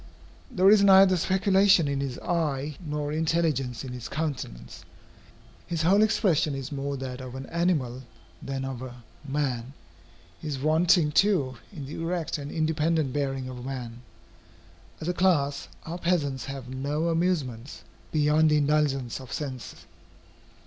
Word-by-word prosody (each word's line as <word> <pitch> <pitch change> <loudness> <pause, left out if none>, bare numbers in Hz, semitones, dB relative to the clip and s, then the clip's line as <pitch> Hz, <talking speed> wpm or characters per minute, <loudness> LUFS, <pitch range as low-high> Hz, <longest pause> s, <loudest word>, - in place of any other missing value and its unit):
There 190 +2 +5
is 210 -1 +6
neither 190 -1 +7
speculation 190 -1 +4
in 140 -1 -1
his 135 -3 -3
eye 150 -4 -1
nor 150 -1 -3
intelligence 155 -6 0
in 130 -2 -6
his 125 -2 -6
countenance. 130 - -5 0.8
His 165 -2 -2
whole 195 +5 +5
expression 185 -9 +2
is 135 0 -6
more 140 0 -3
that 130 -1 -6
of 130 0 -8
an 130 0 -6
animal 150 -8 0 0.4
than 135 -1 -4
of 130 -2 -5
a 125 -2 -9 0.2
man. 135 -3 -2 0.7
He - - -7
is 145 -2 -2
wanting 160 +2 +3
too 150 - +2
in 150 -9 -7
the 145 +4 -6
erect 165 -2 -2
and 140 0 -6
independent 155 -3 0
bearing 135 -2 -2
of 130 -1 -7
a - - -8
man. 120 -2 -6 1.0
As 160 - -6
a 180 - +1
class, 150 -6 +1 0.2
our 170 +2 -5
peasants 145 -8 0
have 135 -2 -7
no 145 +6 -2
amusements 145 - -1 0.3
beyond 155 +1 +3
the 150 - +4
indulgence 145 -4 +1
of 130 - -11
sense. 130 -5 -5
145 Hz, 150 wpm, -27 LUFS, 130-165 Hz, 1.0 s, neither